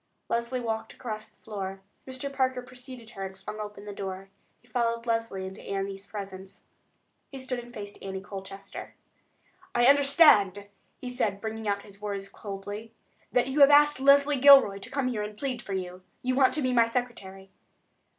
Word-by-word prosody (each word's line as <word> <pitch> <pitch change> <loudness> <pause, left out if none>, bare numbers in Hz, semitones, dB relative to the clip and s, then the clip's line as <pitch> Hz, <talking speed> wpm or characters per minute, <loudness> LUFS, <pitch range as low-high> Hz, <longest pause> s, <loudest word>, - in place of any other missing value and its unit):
Leslie 235 +2 -1
walked 225 -2 -3
across 215 -3 -6
the 215 0 -13
room. 195 -1 -4 0.3
Mr. 260 +2 -5
Parker 260 -2 0
preceded 250 -2 -11
her 195 - -6
and 190 0 -6
flung 200 +3 -8
open 205 -1 -7
the 205 - -6
door. 195 0 -6 0.3
He 245 - -27
followed 230 0 -1
Leslie 225 -5 -1
into 190 +2 -8
Annie's 195 0 -4
presence. 195 -1 -8 0.7
He 275 - -8
stood 260 -1 -4
and 240 0 -10
faced 205 -3 -8
Annie 190 -1 -5
Colchester. 195 0 -9 0.8
"I 240 - +4
understand," 275 - +6 0.3
he 255 - -8
said, 220 -6 -1
bringing 220 0 -5
out 200 0 0
his 200 0 -14
words 200 -1 -4
coldly, 205 +2 -7 0.4
"that 250 +1 +2
you 275 +3 -1
have 280 0 +9
asked 295 -1 +6
Leslie 280 +1 +5
Gilroy 270 -8 +8
to - - -9
come 275 -2 -1
here 235 -4 -1
and 210 0 -6
plead 255 -1 -3
for 200 - -6
you. 180 -1 -4 0.2
You 255 0 +1
want 260 0 +4
to 305 - 0
be 255 -1 +1
my 235 -2 +5
secretary?" 195 -6 -4
220 Hz, 180 wpm, -28 LUFS, 195-255 Hz, 0.8 s, have